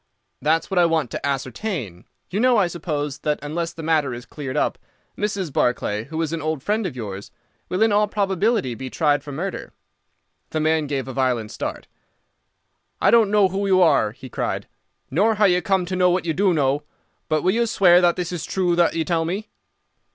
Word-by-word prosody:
"That's 160 +4 +1
what 190 - +2
I 175 - +6
want 160 -7 0
to - - -5
ascertain. 135 - -3 0.3
You 195 - -1
know, 250 0 +4
I 200 - +4
suppose, 150 -5 -3
that 150 -1 0
unless 165 +3 -3
the 165 - -9
matter 155 -5 +1
is 120 +1 -9
cleared 135 -4 -6
up, - - 0 0.4
Mrs. 200 -7 -2
Barclay, 110 -4 0
who 160 +2 -5
is 160 0 -3
an 165 - -2
old 155 -2 -2
friend 210 +1 0
of 150 - -7
yours, 100 -4 -6 0.4
will 185 +4 +1
in 225 - +3
all 210 +1 +3
probability 200 - 0
be 130 +3 -6
tried 145 0 +1
for 145 - -8
murder." 180 +7 -5 0.8
The 155 - -2
man 155 -1 +1
gave 135 -2 -2
a 130 - -5
violent 125 -4 0
start. - - -5 1.1
"I - - +4
don't 230 -3 +5
know 205 -2 +4
who 195 +2 -2
you 190 -1 +4
are," 160 - +4
he 125 +3 -11
cried, - - -3 0.4
"nor 210 +10 +3
how 210 0 +3
you 180 -2 +3
come 190 -3 +1
to 185 +1 -3
know 180 0 +4
what 180 0 0
you 165 - 0
do 195 +3 +2
know, 145 -3 +1 0.5
but 155 -1 +1
will 185 - +3
you 235 +1 +1
swear 180 -4 +5
that 175 -1 +3
this 180 -1 -3
is 175 -3 -4
true 180 -2 0
that 170 -1 +3
you 165 -1 0
tell 165 -1 +1
me?" 190 +6 -4
165 Hz, 210 wpm, -22 LUFS, 145-190 Hz, 1.1 s, I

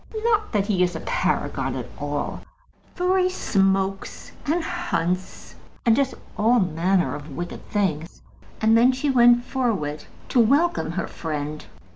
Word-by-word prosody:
Not 435 -2 +1
that 205 -3 +1
he 200 -4 0
is 175 -1 +1
a - - -3
Paragon - - -1
at - - -4
all, - - -3 0.5
for 365 +1 +2
he 365 0 +3
smokes 195 - -1 0.2
and 325 +3 +1
hunts, 185 - -3 0.3
and 230 -1 +5
does 275 0 0 0.2
all 235 +4 +4
manner 175 - +1
of 145 -1 -8
wicked 175 0 -6
things." 170 -5 -2 0.4
And 220 +1 +4
then 240 +3 +6
she 275 +2 0
went 240 -1 +5
forward 200 - -2 0.2
to 250 - +2
welcome 280 - +2
her 185 - -2
friend. 150 -1 -5
210 Hz, 145 wpm, -23 LUFS, 175-265 Hz, 0.5 s, then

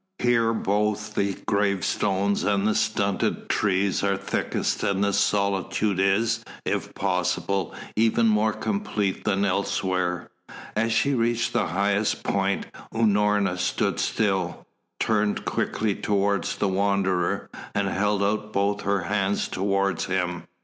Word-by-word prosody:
Here 115 -2 +2
both 105 -1 0
the 100 -1 0
gravestones 100 0 +1
and 100 -1 +1
the 110 - +2
stunted 100 -3 0
trees 100 -2 +1
are 100 -1 +1
thickest, - - -2
and 100 0 +1
the 100 0 +1
solitude 100 0 +1
is, 110 +4 +2 0.2
if - - -2
possible, 95 -4 -1 0.2
even 115 +1 +3
more 110 0 +3
complete 105 - -2
than 100 +1 +2
elsewhere. 90 -2 -1 0.4
As 115 +2 +1
she 140 +5 +2
reached 120 -1 0
the - - +1
highest 100 +4 0
point 100 0 0 0.3
Unorna 105 -4 +2
stood 90 - 0
still, 95 -5 0 0.3
turned 105 -2 +1
quickly 110 -2 0
towards 100 0 0
the 100 - 0
Wanderer 95 -1 0 0.2
and 100 -1 +1
held 100 +1 +1
out 105 +1 -1
both 100 0 0
her 100 -1 0
hands 100 0 0
towards 100 0 0
him. 90 -2 -2
100 Hz, 125 wpm, -25 LUFS, 95-105 Hz, 0.4 s, even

